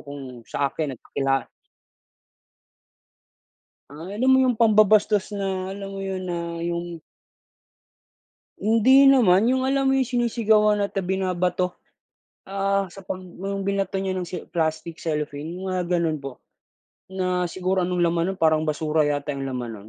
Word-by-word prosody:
kung 135 -4 -9
sa 140 -1 -1
akin 145 -5 -3
nagpakila 135 +3 -1 2.5
Ah, 145 - -11 0.2
alam 255 +5 +2
mo, 265 - +6
yung 250 -1 +2
pambabastos 215 -2 +3
na, 190 -1 -3
alam 195 0 -7
mo - - -6
'yon, 190 -1 -4
na 170 -2 -4
yung 170 -1 -4 1.6
Hindi 255 +6 +5
naman, 225 -6 +5
yung 260 +1 +2
alam 270 0 +1
mo 270 - +3
yung, 265 - +2
sinisigawan 220 -4 +2
at, 200 - -5
ah, - - -7
binabato. 180 -1 -1 0.7
Ah, 195 0 0
sa 195 +2 -13
'pag 185 0 -5
yung 195 +2 -5
binato 195 -1 -1
niya 190 -1 -2
ng 185 - -2
si 180 - -5
plastic, 160 0 -2
cellophane, 150 0 -3
yung 190 - -5
mga 185 -1 -1
gano'n 170 -3 +1
po. 135 -2 -8 0.7
Na, 185 -1 0
siguro 185 +1 -1
anong 180 0 -1
laman 170 -1 +2
no'n, 195 - -10
parang 155 -1 +3
basura 155 0 0
yata 145 0 -2
yung 135 - -4
laman 125 -3 -4
no'n, 105 +1 -13
185 Hz, 150 wpm, -24 LUFS, 160-200 Hz, 2.5 s, mo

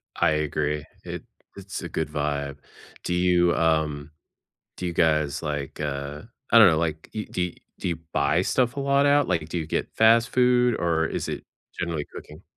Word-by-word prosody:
I - - +3
agree. 75 -1 -1 0.2
It - - -6 0.3
it's 100 -1 -7
a 85 - -6
good 80 -1 -2
vibe. 70 -1 -2 0.5
Do 90 - -1
you, 90 -1 +3
um, 80 -2 0 0.7
do 90 - -4
you 85 - -2
guys, 75 -4 +1
like, 75 -1 -4
uh, 70 0 -4 0.3
I 115 - +9
don't 110 -4 +9
know. 80 -2 +3
Like, 80 -1 -2
you 105 -1 -4
do 90 -1 -2 0.3
do - - -2
you 85 - -1 0.2
buy - - +2
stuff 125 -1 +1
a 140 - -2
lot 140 +1 +3
out? 145 0 +4
Like, 80 -1 0
do 90 - -4
you 80 - -4
get - - -2
fast 115 +2 +5
food, 125 -2 +3
or 80 -2 +1
is - - -4
it - - -5 0.3
generally 85 -4 -2
cooking? 75 - -10
80 Hz, 185 wpm, -25 LUFS, 75-100 Hz, 0.7 s, I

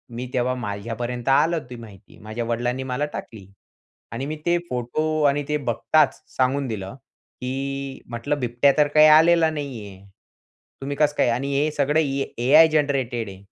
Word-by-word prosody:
मी 125 +2 -4
तेव्हा 125 0 0
माझ्यापर्यंत 120 +2 -5
आलं 160 +5 +3
ती 125 - -8
माहिती. 110 -4 -14
माझ्या 110 +3 -5
वडिलांनी 120 +3 -2
मला 130 +2 -2
टाकली 105 -5 -8 0.6
आणि 120 +4 -4
मी 155 +2 -4
ते 175 0 +3
फोटो 155 +6 -2
आणि 145 +1 -1
ते 150 - +1
बघताच 145 +3 +1
सांगून 135 +2 +1
दिलं 100 -2 -6 0.5
की 135 +1 -4
म्हटलं, 120 +5 -3
"बिबट्या 125 +2 +2
तर 150 -1 +4
काही 155 +1 +6
आलेला 160 +1 +6
नाही 140 -8 -6
आहे. 95 0 -14 0.8
तुम्ही 140 +1 -4
कसं 150 -1 +2
काय - - +3
आणि 125 +4 -1
हे 145 +2 +2
सगळं 150 +1 +1
ए 140 -2 -2
AI 155 +5 +7
जनरेटेड 135 -7 0
आहे." 95 0 -12
135 Hz, 165 wpm, -23 LUFS, 120-150 Hz, 0.8 s, AI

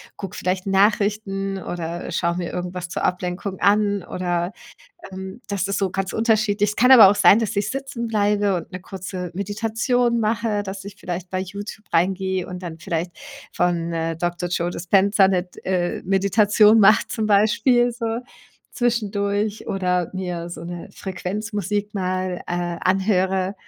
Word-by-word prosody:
gucke 195 -3 -7
vielleicht 185 +1 -2
Nachrichten 195 -1 +1
oder 170 0 -5
schaue 170 0 0
mir 175 -1 -3
irgendwas 180 0 -5
zur - - -4
Ablenkung 180 +1 -2
an 205 -1 +2
oder, 175 0 -2 0.6
ähm 190 +3 -8
das 200 -2 -1
ist 200 - -1
so 195 -2 0
ganz 195 0 -3
unterschiedlich. 215 -2 +2
Es 210 - -7
kann 250 +3 +6
aber 230 -6 +10
auch - - +2
sein, 200 +1 +6
dass 220 -2 -2
ich 205 +1 0
sitzen 270 -3 -4
bleibe 205 -2 +1
und 170 - -6
'ne 185 - -6
kurze 185 -1 -6
Meditation 230 +4 0
mache, 220 -1 0
dass 195 0 -7
ich 200 0 -9
vielleicht 180 -1 -6
bei 185 - -1
YouTube 200 +3 -7
reingehe 190 +1 +1
und 180 0 -7
dann 165 -2 -7
vielleicht 170 +1 -3 0.4
von, 170 -1 0
äh, 165 0 -2
Dr 175 +1 -2
Joe 175 0 -1
Dispenza 195 +3 +3
'ne 185 -2 +1
d 180 - -15
äh, 180 -2 -1
Meditation 195 +3 +2 0.4
mache 210 +1 +6
zum 220 -2 -2
Beispiel 220 +4 +3
so 230 -1 -3 0.5
zwischendurch 210 -3 -1
oder 180 -3 0
mir 180 -2 -4
so 165 - -7
'ne 175 0 -7
Frequenzmusik 205 +2 -3
mal, 185 -1 -2
äh, 175 -1 -2
anhöre, 190 0 +1
195 Hz, 155 wpm, -22 LUFS, 180-210 Hz, 0.6 s, aber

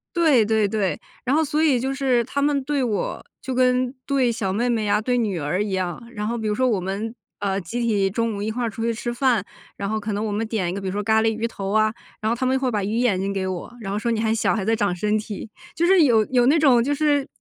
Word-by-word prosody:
对， 305 -10 +4
对， 220 -1 +2
对， 200 -2 -1 0.3
然 260 +3 +2
后 320 - +3
所 305 +1 0
以 280 -6 +3
就 265 +2 -1
是 260 -3 +2
她 280 +4 -3
们 285 -1 +1
对 280 0 0
我， 215 -6 -2 0.2
就 260 - -4
跟 250 0 +2
对 265 -4 +2
小 215 -5 -2
妹 230 +6 0
妹 225 -3 0
呀、 205 0 +2
对 245 +2 0
女 210 -7 0
儿 160 +7 -1
一 210 - -4
样， 185 +2 -2
然 210 -2 -3
后 235 +2 -2
比 220 -1 -3
如 210 - 0
说 255 +3 +2
我 220 -6 +1
们， 200 +5 -3 0.3
呃， 195 -1 -1
集 230 +8 -4
体 205 -4 +2
中 230 +2 -1
午 200 - -5
一 210 - -2
块 240 +3 -2
儿 - - -1
出 225 +2 -5
去 230 0 +1
吃 240 +1 -4
饭， 240 -4 +2 0.3
然 200 - -4
后 215 +1 -1
可 215 0 -4
能 205 +2 -2
我 215 - -2
们 210 +2 -1
点 210 -6 -1
一 - - -3
个， 200 - -4
比 195 - -4
如 - - -1
说 205 +2 -2
咖 220 +1 +3
喱 225 - +3
鱼 225 +1 -2
头 195 -4 -5
啊， 215 0 +3 0.3
然 215 - -1
后 - - +1
她 255 - -2
们 260 +1 +2
会 260 -2 0
把 210 -3 -1
鱼 210 +3 -1
眼 235 -6 +2
睛 195 +1 -1
给 195 -1 -2
我， 185 +2 -5
然 195 -4 -5
后 205 - -1
说： 235 +2 -1
“你 225 - 0
还 220 0 +1
小， 225 - +1
还 205 -4 -2
在 225 +2 +2
长 200 -4 0
身 210 +4 +1
体。” 215 0 -7 0.3
就 340 - +1
是 370 -2 +6
有 225 -6 +4
有 245 0 +2
那 295 +5 +5
种 265 -6 +5
就 290 +3 0
是， 290 -2 +1
225 Hz, 315 characters per minute, -23 LUFS, 205-255 Hz, 0.3 s, 是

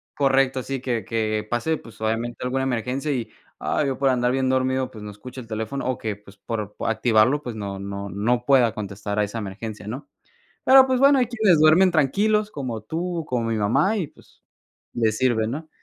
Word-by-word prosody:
correcto, 135 -2 +2
sí, 135 +1 -3
que 120 -4 -2
que 110 -1 -1
pase, 140 +7 0
pues, 115 - -15
obviamente, 115 +2 -2
alguna 130 +1 -1
emergencia 130 +3 -2
y, 125 -5 -3 0.3
ay, 150 - 0
yo 135 - -2
por 135 -1 +2
andar 125 -1 +2
bien 130 0 0
dormido, 130 0 0
pues 110 -2 -10
no 105 - -6
escucho 125 +5 -10
el 115 - -13
teléfono, 110 +5 -4
o 130 - -1
que, 110 -2 -3
pues 100 -1 -18
por 105 -3 -5
activarlo, 115 +4 +3
pues 120 -5 -6
no 100 -2 -5
no 100 0 -5
no 120 +6 0
pueda 125 -4 +4
contestar 100 0 -5
a - - +3
esa 105 +3 -4
emergencia, 105 +1 -7
¿no? 130 +7 -6 0.6
Pero, 265 0 +8
pues 260 -1 +1
bueno, 275 0 +6
hay 250 - +3
quienes 220 -8 +3
duermen 160 +5 +6
tranquilos, 205 +8 +2
como 125 - -5
tú, 165 +7 -3
como 120 -2 -1
mi 115 - 0
mamá 135 - +2
y, 180 -8 -2
pues, - - -23 0.5
les 110 -2 +1
sirve, 120 -3 +2
¿no? 155 +7 -5
125 Hz, 200 wpm, -23 LUFS, 110-140 Hz, 0.6 s, Pero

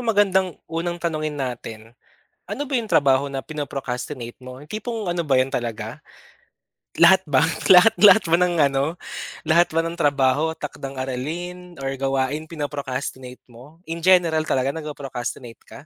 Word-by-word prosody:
magandang 195 -6 +2
unang 170 +2 -3
tanungin 155 -3 -3
natin, 115 -4 -6 0.5
ano - - -4
ba 275 -3 -1
yung 230 - -4
trabaho 140 -7 +3
na 135 -1 -4
pino-procrastinate 135 -4 -5
mo? 130 +1 -11
Yung 150 - -16
tipong 215 -2 -4
ano 170 -2 -2
ba 140 - +2
'yon 130 +1 +2
talaga? 115 -3 -4 1.0
Lahat 190 +3 +7
ba, 140 +2 +4 0.2
lahat 190 +5 +8
lahat 210 0 +8
ba 165 - -1
ng 180 -1 +2
ano 140 +2 +1 0.5
lahat 170 +2 +4
ba 165 +1 0
ng 165 - -3
trabaho, 145 0 +1
takdang-aralin 150 +6 -6
or 135 - -1
gawain 135 +3 -1
pino-procrastinate 140 -4 -5
mo? 130 +6 -16
In 165 +1 -5
general 170 -3 +4
talaga 135 +1 +1
nagpo-procrastinate 135 -6 -6
ka? 145 - -12
150 Hz, 145 wpm, -22 LUFS, 130-175 Hz, 1.0 s, lahat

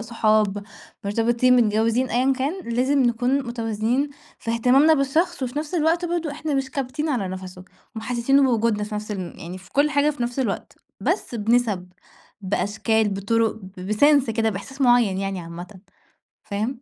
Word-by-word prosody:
صحاب 215 -3 +1 0.4
مرتبطين 235 +4 +3
متجوّزين 230 +2 +2
أيًا 255 +4 +2
كان 280 +8 -2
لازم 265 +3 +2
نكون 250 +3 +1
متوازنين 235 +4 -1 0.3
في 230 - -4
اهتمامنا 255 +7 +4
بالشخص، 310 +4 0
وفي 255 +3 -2
نَفْس 305 +3 -5
الوقت 330 +1 +2
برضه 340 -2 -2
إحنا 300 +1 -3
مش 270 -1 -1
كابتين 275 +4 -3
على 240 -10 -1
نفَسُه 185 -1 -8 0.3
ومحسسينه 245 +4 +2
بوجودنا 230 -4 +2
في 210 0 -7
نَفْس 210 +1 -5
الم 185 -4 -4
يعني 175 +3 -7
في 185 - -17
كل 290 +2 +3
حاجة 295 0 +3
في 280 -4 -5
نَفْس 240 +2 -3
الوقت، 235 -7 -3 0.2
بس - - -1
بنِسَب، 220 -4 +1 0.5
بأشكال، 210 +3 0
بطُرُق 215 +3 +1 0.2
ب 185 +3 -4
بsense 280 +2 +4
كده 225 0 +1
بإحساس 220 +8 -8
معيّن 240 -7 +4
يعني 195 -1 -3
عامةً. 175 +3 -9 0.6
فاهم؟ 220 +5 -3
235 Hz, 155 wpm, -23 LUFS, 210-275 Hz, 0.6 s, اهتمامنا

